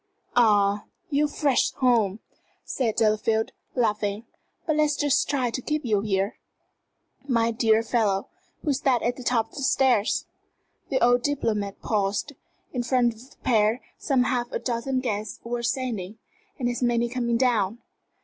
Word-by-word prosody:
"Ah, 205 Hz, -3 st, +4 dB, 0.3 s
you're 295 Hz, +1 st, +3 dB
fresh 285 Hz, -3 st, +1 dB
home," 225 Hz, -5 st, +2 dB, 0.4 s
said 235 Hz, -5 st, -1 dB
Delafield, 220 Hz, 0 st, +1 dB, 0.2 s
laughing. 210 Hz, -2 st, 0 dB, 0.4 s
"But 310 Hz, -2 st, +1 dB
let's 300 Hz, -1 st, +3 dB
just 290 Hz, -1 st, +1 dB
try 260 Hz, -4 st, 0 dB
to 255 Hz, -, -3 dB
keep 300 Hz, +1 st, -2 dB
you 210 Hz, -4 st, +2 dB
here 200 Hz, 0 st, -1 dB, 0.4 s
" -, -, -50 dB
"My 230 Hz, -3 st, +2 dB
dear 225 Hz, -1 st, +3 dB
fellow, 215 Hz, -4 st, +1 dB, 0.4 s
who 300 Hz, -, +1 dB
is 275 Hz, +1 st, -1 dB
that 250 Hz, -4 st, +2 dB
at 240 Hz, +1 st, 0 dB
the -, -, -9 dB
top 230 Hz, -2 st, +1 dB
of -, -, -18 dB
the -, -, -4 dB
stairs?" 260 Hz, -5 st, +2 dB, 0.6 s
The 265 Hz, -, +1 dB
old 245 Hz, 0 st, +4 dB
diplomat 220 Hz, -8 st, -2 dB
paused. 205 Hz, +6 st, -1 dB, 0.4 s
In 250 Hz, -, 0 dB
front 240 Hz, -1 st, +2 dB
of 235 Hz, +4 st, -16 dB
the -, -, -22 dB
pair 220 Hz, -1 st, +3 dB, 0.2 s
some 265 Hz, -3 st, +2 dB
half 245 Hz, -1 st, -1 dB
a -, -, -1 dB
dozen 255 Hz, +2 st, -2 dB
guests 215 Hz, -4 st, -3 dB
were 240 Hz, +1 st, -3 dB
ascending, 235 Hz, -5 st, -2 dB, 0.4 s
and 245 Hz, -, -1 dB
as 245 Hz, +1 st, -2 dB
many 240 Hz, -1 st, +2 dB
coming 235 Hz, -1 st, 0 dB
down. 230 Hz, -4 st, +1 dB
235 Hz, 160 wpm, -25 LUFS, 215-255 Hz, 0.6 s, Ah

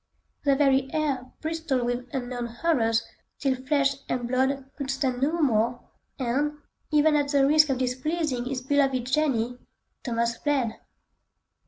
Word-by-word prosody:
The 280 Hz, -1 st, +4 dB
very 270 Hz, -1 st, +3 dB
air 275 Hz, -5 st, -1 dB
bristled 320 Hz, -5 st, -1 dB
with 245 Hz, +1 st, -2 dB
unknown 245 Hz, -2 st, -3 dB
horrors 230 Hz, -3 st, +1 dB, 0.3 s
till 270 Hz, -2 st, +1 dB
flesh 275 Hz, +1 st, +1 dB
and 245 Hz, -1 st, -1 dB
blood 265 Hz, +2 st, +1 dB
could 275 Hz, -2 st, -5 dB
stand 265 Hz, -2 st, -1 dB
no 310 Hz, +5 st, +1 dB
more, 240 Hz, -4 st, +2 dB, 0.4 s
and, 285 Hz, +3 st, 0 dB, 0.3 s
even 300 Hz, 0 st, +4 dB
at 290 Hz, -1 st, +2 dB
the 280 Hz, -1 st, +3 dB
risk 305 Hz, +1 st, +5 dB
of 265 Hz, -, +1 dB
displeasing 260 Hz, +1 st, -1 dB
his 255 Hz, 0 st, -3 dB
beloved 270 Hz, -2 st, +2 dB
Jenny, 250 Hz, -4 st, 0 dB, 0.4 s
Thomas 235 Hz, -3 st, -1 dB
fled! 270 Hz, -6 st, 0 dB
265 Hz, 140 wpm, -26 LUFS, 245-290 Hz, 0.4 s, risk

